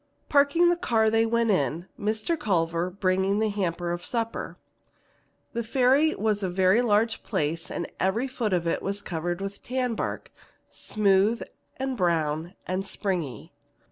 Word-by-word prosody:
Parking 290 Hz, +4 st, +4 dB
the 350 Hz, -, +3 dB
car, 225 Hz, -9 st, +2 dB
they 225 Hz, 0 st, +3 dB
went 230 Hz, -1 st, +2 dB
in, 160 Hz, +1 st, 0 dB
Mr. 215 Hz, +9 st, 0 dB
Culver 170 Hz, -, 0 dB
bringing 190 Hz, +1 st, +1 dB
the 220 Hz, 0 st, +1 dB
hamper 175 Hz, -4 st, -2 dB
of 175 Hz, 0 st, -4 dB
supper. 230 Hz, +1 st, -3 dB, 1.0 s
The 235 Hz, -1 st, -2 dB
Ferry 265 Hz, +6 st, +3 dB
is 215 Hz, -6 st, 0 dB
a 190 Hz, -, -1 dB
very 185 Hz, +5 st, +3 dB
large 225 Hz, -1 st, +2 dB
place 165 Hz, -4 st, -2 dB
and 170 Hz, -, -3 dB
every 220 Hz, +8 st, +1 dB
foot 240 Hz, -5 st, -2 dB
of 175 Hz, -2 st, +1 dB
it 170 Hz, -, 0 dB
is 200 Hz, +1 st, -2 dB
covered 175 Hz, +1 st, -3 dB
with 195 Hz, 0 st, -5 dB
tan 250 Hz, -1 st, -1 dB
bark, -, -, -4 dB, 0.4 s
smooth 210 Hz, +2 st, +2 dB, 0.3 s
and 265 Hz, 0 st, -2 dB
brown 165 Hz, -2 st, 0 dB
and 185 Hz, +2 st, -2 dB
springy. 170 Hz, -, -3 dB
200 Hz, 150 wpm, -26 LUFS, 175-230 Hz, 1.0 s, Parking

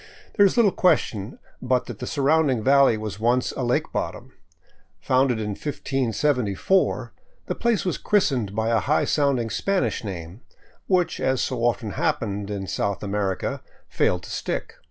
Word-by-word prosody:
There 200 Hz, -2 st, +6 dB
is 195 Hz, -, -3 dB
little 220 Hz, -5 st, +5 dB
question 135 Hz, -, +1 dB, 0.2 s
but 125 Hz, 0 st, +1 dB
that 115 Hz, -4 st, -8 dB
the -, -, -5 dB
surrounding 140 Hz, -4 st, +2 dB
valley 135 Hz, -3 st, +5 dB
was 110 Hz, -1 st, -6 dB
once 120 Hz, +3 st, +1 dB
a -, -, -5 dB
lake 120 Hz, 0 st, 0 dB
bottom. -, -, -4 dB, 0.7 s
Founded 130 Hz, -2 st, +2 dB
in 105 Hz, -1 st, -3 dB
1574, 135 Hz, -, 0 dB, 0.3 s
the -, -, -2 dB
place 235 Hz, -4 st, 0 dB
was 180 Hz, -, -1 dB
christened 130 Hz, -, +1 dB
by 110 Hz, +1 st, 0 dB
a 115 Hz, -1 st, +3 dB
high 150 Hz, +7 st, +1 dB
sounding 135 Hz, -6 st, +1 dB
Spanish 195 Hz, -9 st, 0 dB
name, 90 Hz, 0 st, -7 dB, 0.5 s
which, 180 Hz, -2 st, +1 dB
as 130 Hz, -1 st, +1 dB
so 120 Hz, -2 st, -2 dB
often 115 Hz, -3 st, 0 dB
hap -, -, 0 dB
pened 100 Hz, -2 st, -4 dB
in 100 Hz, -2 st, -4 dB
South 100 Hz, +2 st, -2 dB
America, 100 Hz, -2 st, -2 dB, 0.3 s
failed 90 Hz, 0 st, +1 dB
to -, -, -9 dB
stick. -, -, -4 dB
125 Hz, 155 wpm, -24 LUFS, 105-145 Hz, 0.7 s, There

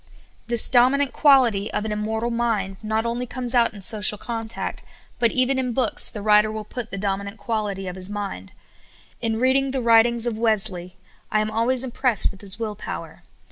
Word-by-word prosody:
This 235 Hz, -1 st, +5 dB
dominant 260 Hz, +3 st, +3 dB
quality 250 Hz, -9 st, +3 dB
of 210 Hz, -, -3 dB
an 220 Hz, -, -3 dB
immortal 220 Hz, +2 st, -2 dB
mind 220 Hz, -5 st, -2 dB
not 220 Hz, +1 st, -2 dB
only 240 Hz, +2 st, -3 dB
comes 250 Hz, 0 st, -3 dB
out 235 Hz, -2 st, +3 dB
in 205 Hz, -3 st, -9 dB
social 210 Hz, +1 st, +2 dB
contact, 225 Hz, 0 st, -4 dB, 0.4 s
but 235 Hz, -1 st, +3 dB
even 260 Hz, +1 st, +1 dB
in 250 Hz, -2 st, -2 dB
books 255 Hz, +1 st, +2 dB
the 210 Hz, -3 st, -8 dB
writer 210 Hz, 0 st, +4 dB
will 215 Hz, 0 st, -5 dB
put 230 Hz, +2 st, -7 dB
the 195 Hz, -, -6 dB
dominant 200 Hz, +1 st, -3 dB
quality 205 Hz, -2 st, -3 dB
of 180 Hz, -, -6 dB
his 185 Hz, 0 st, -3 dB
mind. 200 Hz, -, -6 dB, 0.7 s
In 225 Hz, -2 st, -1 dB
reading 265 Hz, +2 st, +2 dB
the 265 Hz, 0 st, -2 dB
writings 235 Hz, 0 st, +3 dB
of 240 Hz, -, 0 dB
Wesle}^ 200 Hz, -6 st, -1 dB, 0.4 s
I 215 Hz, -, +2 dB
am 215 Hz, 0 st, -2 dB
always 240 Hz, +3 st, +1 dB
impressed 250 Hz, -3 st, +3 dB
with 195 Hz, -, -12 dB
his 195 Hz, -1 st, -2 dB
will 225 Hz, -2 st, -4 dB
power. 210 Hz, -, -8 dB
225 Hz, 185 wpm, -22 LUFS, 205-240 Hz, 0.7 s, This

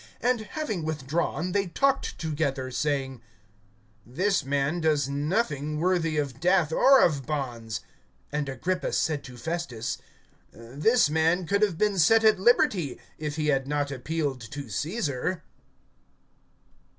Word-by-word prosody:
(31)And 240 Hz, -2 st, +1 dB
having 215 Hz, -, -3 dB
withdrawn, 155 Hz, +3 st, -2 dB
they 195 Hz, 0 st, +1 dB
talked 275 Hz, +10 st, 0 dB
together, 145 Hz, -5 st, -2 dB
saying: 135 Hz, -3 st, -2 dB, 0.8 s
This 185 Hz, -, 0 dB
man 140 Hz, +5 st, 0 dB
does 150 Hz, -3 st, +2 dB
nothing 150 Hz, -, -1 dB
worthy 165 Hz, -2 st, +1 dB
of 140 Hz, -4 st, -2 dB
death 175 Hz, -1 st, +3 dB
or 270 Hz, +7 st, +6 dB
of 145 Hz, -6 st, +1 dB
bonds. 120 Hz, -7 st, -3 dB, 0.5 s
(32)And 150 Hz, -1 st, -1 dB
Agrippa 180 Hz, +8 st, -2 dB
said 155 Hz, -3 st, 0 dB
to 125 Hz, -2 st, -10 dB
Festus: 140 Hz, -4 st, -4 dB, 0.5 s
This 145 Hz, -, +2 dB
man 160 Hz, +4 st, +2 dB
could 200 Hz, +5 st, +1 dB
have 200 Hz, -6 st, +2 dB
been 205 Hz, -1 st, +1 dB
set 225 Hz, +7 st, +5 dB
at 215 Hz, -3 st, +5 dB
liberty, 190 Hz, -, +2 dB, 0.2 s
if 150 Hz, -1 st, -3 dB
he 155 Hz, -1 st, 0 dB
had 135 Hz, -2 st, +1 dB
not 145 Hz, -1 st, -1 dB
appealed 140 Hz, 0 st, -2 dB
to 140 Hz, -4 st, -7 dB
Caesar. 160 Hz, -, -2 dB
155 Hz, 130 wpm, -27 LUFS, 140-180 Hz, 0.8 s, or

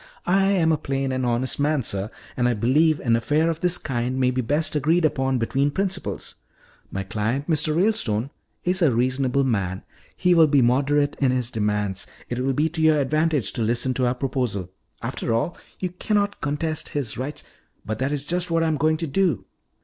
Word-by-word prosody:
I 195 Hz, +2 st, +3 dB
am 180 Hz, -5 st, +3 dB
a 155 Hz, -, +1 dB
plain 135 Hz, -2 st, -2 dB
and 130 Hz, -1 st, -1 dB
honest 120 Hz, +3 st, -1 dB
man, 145 Hz, -1 st, +1 dB
sir, 100 Hz, 0 st, -3 dB, 0.3 s
and 125 Hz, -1 st, +2 dB
I 120 Hz, -, +1 dB
believe 150 Hz, +8 st, +3 dB
an 115 Hz, -3 st, +2 dB
affair 150 Hz, +8 st, +1 dB
of 165 Hz, -, -5 dB
this 180 Hz, 0 st, +2 dB
kind 125 Hz, 0 st, -2 dB
may 125 Hz, -1 st, +3 dB
be 130 Hz, 0 st, -1 dB
best 150 Hz, +6 st, 0 dB
agreed 160 Hz, +4 st, +2 dB
upon 135 Hz, -3 st, +1 dB
between 135 Hz, +4 st, +1 dB
principals. 190 Hz, +4 st, -2 dB, 0.5 s
My 95 Hz, -, -3 dB
client, 110 Hz, +8 st, -2 dB
Mr. 155 Hz, -1 st, +1 dB
Ralestone, 140 Hz, -, +1 dB, 0.3 s
is 185 Hz, +1 st, 0 dB
a 160 Hz, -6 st, +5 dB
reasonable 130 Hz, +3 st, +1 dB
man; 100 Hz, -7 st, -1 dB, 0.3 s
he 180 Hz, -1 st, +3 dB
will 165 Hz, -2 st, +6 dB
be 140 Hz, -3 st, +4 dB
moderate 140 Hz, +4 st, +2 dB
in 135 Hz, -, +3 dB
his 125 Hz, -1 st, 0 dB
demands. 105 Hz, -3 st, -1 dB, 0.2 s
It 120 Hz, -, -3 dB
will 135 Hz, +1 st, 0 dB
be 150 Hz, +4 st, +2 dB
to 160 Hz, 0 st, -4 dB
your 155 Hz, -1 st, +5 dB
advantage 150 Hz, -4 st, +1 dB
to -, -, -3 dB
listen 120 Hz, +3 st, +1 dB
to 125 Hz, -1 st, +1 dB
our 120 Hz, -, 0 dB
proposal. 125 Hz, -9 st, -2 dB, 0.3 s
After 115 Hz, -, -2 dB
all, 140 Hz, +9 st, -1 dB, 0.2 s
you 185 Hz, -, -2 dB
cannot 205 Hz, +3 st, -1 dB
contest 150 Hz, +2 st, -2 dB
his 125 Hz, -7 st, -2 dB
rights 140 Hz, +3 st, -3 dB, 0.2 s
" -, -, -42 dB
"But 110 Hz, 0 st, -3 dB
that 135 Hz, +2 st, 0 dB
is 145 Hz, -1 st, -2 dB
just 175 Hz, +3 st, 0 dB
what 165 Hz, 0 st, +2 dB
I -, -, +2 dB
am 155 Hz, -, 0 dB
going 155 Hz, +2 st, +2 dB
to 165 Hz, 0 st, -3 dB
do." 175 Hz, +4 st, +1 dB
140 Hz, 205 wpm, -23 LUFS, 120-160 Hz, 0.5 s, will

